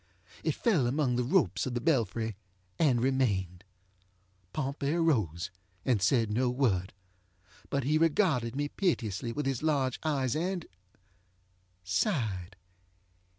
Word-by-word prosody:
It - - 0
fell 180 - +2
among 130 -1 +1
the 125 - +1
ropes 165 +1 +2
of 125 - -3
the - - +1
belfry 115 - 0 0.4
and 135 -7 +4
remained. 100 -9 0 0.9
Pompey 140 +1 -2
arose, 105 - +1 0.3
and 120 -6 +2
said 115 +2 +3
no 125 +4 +2
word. 110 -8 0 0.8
But 140 -1 0
he 150 +4 +2
regarded 150 - +2
me 145 +1 0
piteously 120 - -1
with 145 +4 -3
his 135 -3 -1
large 140 -5 +1
eyes 135 -6 0 1.5
andŌĆösighed. 95 - -1
130 Hz, 115 wpm, -30 LUFS, 110-145 Hz, 1.5 s, and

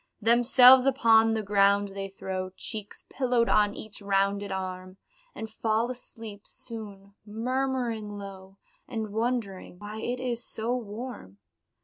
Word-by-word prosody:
Themselves 245 +3 +7
upon 225 -4 +4
the 220 - -2
ground 200 0 +3
they 195 0 -5
throw, 190 -1 -5
Cheeks 215 -3 -7
pillowed 245 -3 +1
on 210 -1 +3
each 215 0 -9
rounded 200 0 0
arm 185 0 -5 0.4
And 220 - -5
fall 220 +2 -1
asleep 225 -4 -10
soon, 200 -4 -10
murmuring 230 -1 -2
low, 195 -1 -10 0.3
And 220 -4 -4
wondering 220 -6 -2
"why 210 +2 -8
it 245 +2 -3
is 245 -2 -2
so 230 +3 -1
warm?" 220 - -7
215 Hz, 125 wpm, -27 LUFS, 200-240 Hz, 0.4 s, Themselves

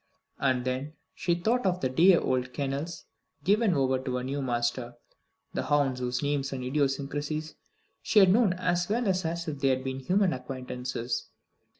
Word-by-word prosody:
And 130 -2 +1
then 130 +4 -2 0.2
she 175 -2 0
thought 225 +8 +1
of 180 -1 0
the 130 - +2
dear 170 +7 +5
old 130 -1 -1
kennels 140 +4 -3 0.4
given 205 -1 +3
over 130 -2 +2
to 130 -1 -3
a 125 - -3
new 140 +2 -2
master; 120 -1 -1 0.6
the - - -1
hounds 140 -3 +2
whose 125 +1 -2
names 145 -1 0
and 130 -2 -4
idiosyncrasies 145 +3 -1 0.5
she - - -1
had 190 -3 +8
known 220 -4 +4
as 180 0 0
well 230 +2 +1
as 185 -2 +1 0.2
if 150 -3 -4
they 135 - +2
had 130 -1 +1
been 130 0 -3
human 185 +6 +2
acquaintances. 125 -2 -4
140 Hz, 170 wpm, -28 LUFS, 130-175 Hz, 0.6 s, had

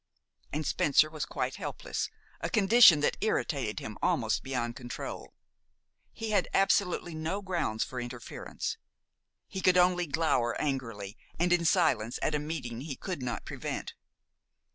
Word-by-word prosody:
And 155 +1 -2
Spencer 155 +2 +3
was 155 -2 -3
quite - - -2
helpless, - - -4 0.3
a - - -2
condition 210 -6 +7
that - - +1
irritated - - 0
him - - -7
almost - - +1
beyond 120 -3 -3
control. 120 -2 -7 0.8
He 225 -1 -5
had 210 - +2
absolutely 180 -3 +2
no 165 +6 -3
grounds 170 - -1
for 125 -1 -5
interference. 120 -1 -5 0.7
He 190 - -5
could 185 -1 +4
only 180 -1 +4
glower 140 -6 +1
angrily 115 -8 -3 0.2
and 175 +1 +3
in 170 -1 +2
silence 135 - +2
at 155 - +1
a 150 - +1
meeting 140 -6 -4
he 140 -1 -5
could 180 -3 -5
not 125 -1 -3
prevent. - - -5
155 Hz, 140 wpm, -30 LUFS, 125-180 Hz, 0.8 s, condition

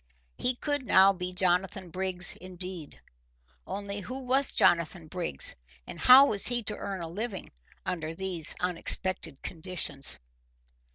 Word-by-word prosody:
He 250 - +1
could 290 +1 -2
now 195 -4 +5
be 180 -1 -4
Jonathan 185 0 -1
Briggs 185 0 +2
indeed. 180 - -9 0.7
Only 200 0 -4
who 255 +6 -7
was 265 +1 0
Jonathan 170 0 +1
Briggs, 155 - -1 0.3
and - - -9
how 260 +2 +8
was 205 -7 +1
he 240 -1 0
to 210 0 -4
earn 195 -3 -5
a 165 - -5
living 200 +3 -5 0.3
under 165 -2 -4
these 180 -3 +1
unexpected 180 -3 +1
conditions? 160 - -1
185 Hz, 130 wpm, -28 LUFS, 170-205 Hz, 0.7 s, how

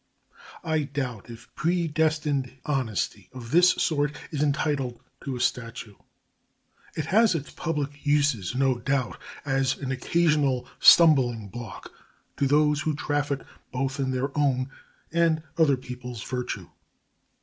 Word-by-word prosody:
I 160 -2 +1
doubt 135 -6 -4
if 115 0 -12
predestined 155 -5 0
honesty 110 -8 -2
of 120 -2 -9
this 180 +3 +6
sort 145 -2 0 0.2
is 145 -3 -2
entitled 140 -4 0 0.2
to 135 -2 -3
a - - -5
statue. 115 -3 -2 1.0
It 155 - -2
has 215 -1 +4
its 150 -3 -4
public 145 -4 -3
uses, 145 - +1
no 130 -2 +2
doubt, 135 +1 -1 0.3
as 135 -1 +1
an 135 -2 -4
occasional 140 -2 +1
stumbling 125 -10 +6
block 115 -1 -8 0.5
to 140 - +2
those 150 +1 +3
who 155 -1 -1
traffic 145 -1 -1 0.3
both 135 +2 -2
in 135 -1 0
their 130 +2 -2
own 135 -3 +1 0.4
and 165 -1 +2
other 155 -5 +4
people's 125 -2 -7
virtue. 125 0 -4
140 Hz, 125 wpm, -26 LUFS, 125-150 Hz, 1.0 s, this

